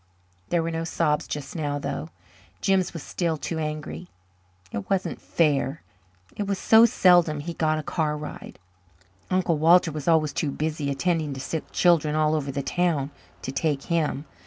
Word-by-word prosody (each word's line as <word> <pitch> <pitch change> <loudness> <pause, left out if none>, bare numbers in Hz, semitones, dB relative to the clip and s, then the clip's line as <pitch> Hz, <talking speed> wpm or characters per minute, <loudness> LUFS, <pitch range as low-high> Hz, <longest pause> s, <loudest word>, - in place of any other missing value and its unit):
There 170 -1 +1
were 165 - -2
no 165 0 -2
sobs 150 -2 0
just 140 -2 -6
now, 145 -3 -1
though 80 - -4 0.5
Jims 190 - +2
was 165 -4 -7
still 170 -3 -1
too 160 +2 -4
angry. 155 +3 -5 0.6
It 100 - -5
wasn't 195 -1 -1
fair. 145 -2 0 0.5
It 205 - -3
was 200 -1 0
so 225 +4 +6
seldom 175 -7 +4
he 170 +3 -5
got 155 -1 +1
a 155 - -3
car 150 -1 -1
ride. 150 0 -8 0.7
Uncle 180 -4 +1
Walter 170 +2 +5
was 150 0 -6
always 155 -3 +3
too 150 - -1
busy, 150 0 -2
attending 155 +1 0
to - - -6
sick 160 +4 -5
children 160 -4 +3
all 155 0 +2
over 145 -3 -1
the 140 +1 -3
town, 155 -4 0 0.3
to - - -3
take 140 0 -1
him. 155 -3 0
155 Hz, 170 wpm, -25 LUFS, 150-170 Hz, 0.7 s, so